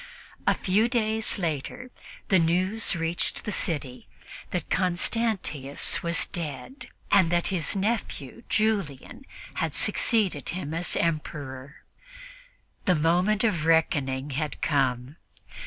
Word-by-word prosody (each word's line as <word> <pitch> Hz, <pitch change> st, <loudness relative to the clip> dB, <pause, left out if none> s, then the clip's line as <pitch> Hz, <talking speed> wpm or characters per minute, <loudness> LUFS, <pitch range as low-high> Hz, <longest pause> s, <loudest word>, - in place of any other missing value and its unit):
A -, -, +5 dB
few 205 Hz, +5 st, +2 dB
days 220 Hz, -2 st, +1 dB
later 180 Hz, -, -3 dB, 0.4 s
the 190 Hz, -, +5 dB
news 185 Hz, +6 st, +2 dB
reached 165 Hz, 0 st, 0 dB
the 210 Hz, -, -2 dB
city 145 Hz, -10 st, -2 dB, 0.4 s
that -, -, -3 dB
Constantius 180 Hz, -, 0 dB
was 170 Hz, 0 st, +1 dB
dead 175 Hz, -, -6 dB, 0.2 s
and 185 Hz, -4 st, +6 dB
that 175 Hz, 0 st, +1 dB
his 175 Hz, 0 st, +1 dB
nephew 200 Hz, -, -2 dB
Julian 210 Hz, -, -1 dB, 0.3 s
had -, -, -1 dB
succeeded 195 Hz, -, +1 dB
him 160 Hz, -4 st, -4 dB
as 170 Hz, +2 st, 0 dB
Emperor. 145 Hz, -4 st, -3 dB, 1.0 s
The 180 Hz, -, +4 dB
moment 180 Hz, +7 st, +2 dB
of 175 Hz, -9 st, +1 dB
reckoning 145 Hz, -4 st, +2 dB
had 150 Hz, +3 st, -3 dB
come. 130 Hz, 0 st, 0 dB
170 Hz, 110 wpm, -27 LUFS, 145-210 Hz, 1.0 s, and